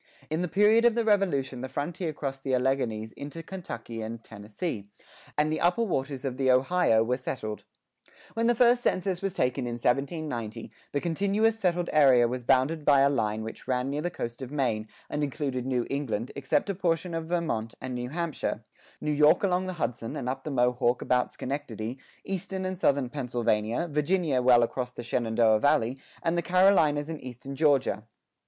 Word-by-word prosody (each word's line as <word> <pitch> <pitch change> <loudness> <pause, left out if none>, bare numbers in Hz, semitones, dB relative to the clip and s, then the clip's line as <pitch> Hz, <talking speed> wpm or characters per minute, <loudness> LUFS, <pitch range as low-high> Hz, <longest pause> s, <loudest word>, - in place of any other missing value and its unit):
In 160 +2 0
the 180 - 0
period 210 +5 +4
of 240 -2 +4
the 235 -1 +1
Revolution 145 - +1
the 130 - -5
frontier 155 +5 -3
crossed 135 -2 -5
the 130 -1 +1
Alleghanies 125 -4 0
into 145 +6 -8
Kentucky 120 -12 -7
and 115 +1 -6
Tennessee, 105 - -6 0.5
and 150 +1 +2
the - - -2
upper 175 +7 +3
waters 140 - -2
of 130 -2 -3
the 135 -1 +1
Ohio 130 -2 +4
were 125 +2 0
settled.[5:6] 110 -4 -8 0.2
When 230 +1 +1
the 240 - +4
first 245 +1 +5
census 185 -5 0
was 195 -1 -2
taken 125 -3 0
in 120 - -3
1790, 120 -3 -2 0.2
the 145 - -1
continuous 200 +6 +1
settled 175 -3 +1
area 130 -5 +6
was 125 +1 -4
bounded 135 +6 +2
by 140 -2 +5
a 140 +1 +5
line 110 -4 -1
which 110 +2 -8
ran 130 +1 0
near 145 +1 -2
the 175 - -1
coast 120 -6 -6
of 130 0 -6
Maine, 120 -7 -1 0.2
and 150 - -2
included 135 -3 -2
New 125 -2 0
England 130 -5 -2
except 140 +8 0
a - - -2
portion 175 -1 -1
of 165 -1 -3
Vermont 160 -10 -2
and 130 0 -5
New 125 0 -4
Hampshire, 170 +1 -3 0.4
New 150 - -1
York 150 +4 +5
along 185 -1 +1
the 185 - -3
Hudson 115 -6 -3
and - - -4
up 135 +1 -3
the - - -3
Mohawk 125 -2 +1
about 125 -1 +1
Schenectady, 130 -3 -5 0.3
eastern 190 0 -3
and 185 0 -2
southern 140 -8 +1
Pennsylvania, 120 0 0
Virginia 150 -2 +1
well 125 -1 +6
across 125 +1 -2
the 120 - -8
Shenandoah 115 -2 +2
Valley, 135 -2 +2 0.2
and 165 +1 +1
the 170 - +1
Carolinas 170 -5 +4
and 160 -2 -6
eastern 130 +2 -8
Georgia. 135 -7 +2
140 Hz, 185 wpm, -28 LUFS, 125-170 Hz, 0.5 s, area